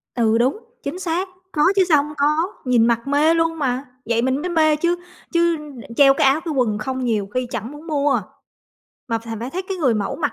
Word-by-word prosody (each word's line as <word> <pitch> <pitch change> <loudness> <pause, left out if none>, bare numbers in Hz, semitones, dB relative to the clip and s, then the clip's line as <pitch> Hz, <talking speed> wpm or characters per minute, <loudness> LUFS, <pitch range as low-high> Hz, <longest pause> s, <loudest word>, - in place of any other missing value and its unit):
Ừ, 225 -2 +2
đúng, 255 - +2 0.3
chính 295 +6 -4
xác, 360 +1 -1 0.2
có 300 - -1
chứ 390 - +5
sao 290 -2 +5
hông 300 0 -8
có, 305 +6 +1
nhìn 240 -3 +4
mặc 235 +1 0
mê 295 +3 +3
luôn 330 0 0
mà, 260 -1 -1 0.2
vậy 230 0 +1
mình 260 +3 0
mới 360 - -3
mê 315 -2 +3
chứ 340 +3 +1 0.4
chứ 340 0 +3
đ 290 -6 -10
treo 275 0 +7
cái 270 - +3
áo, 275 +4 +3
cái 320 - -2
quần 235 -6 +1
không 260 +4 -3
nhiều 215 -4 0
khi 255 -1 -1
chẳng 235 +2 -5
muốn 295 +3 -11
mua, 290 -2 +1 0.9
mà 230 -1 0
phải 225 0 -7
phải 240 +3 -4
thấy 370 +6 -3
cái 380 0 -5
người 270 -9 +2
mẫu 205 -2 -2
mặc 295 -3 -1
280 Hz, 235 wpm, -21 LUFS, 240-325 Hz, 0.9 s, treo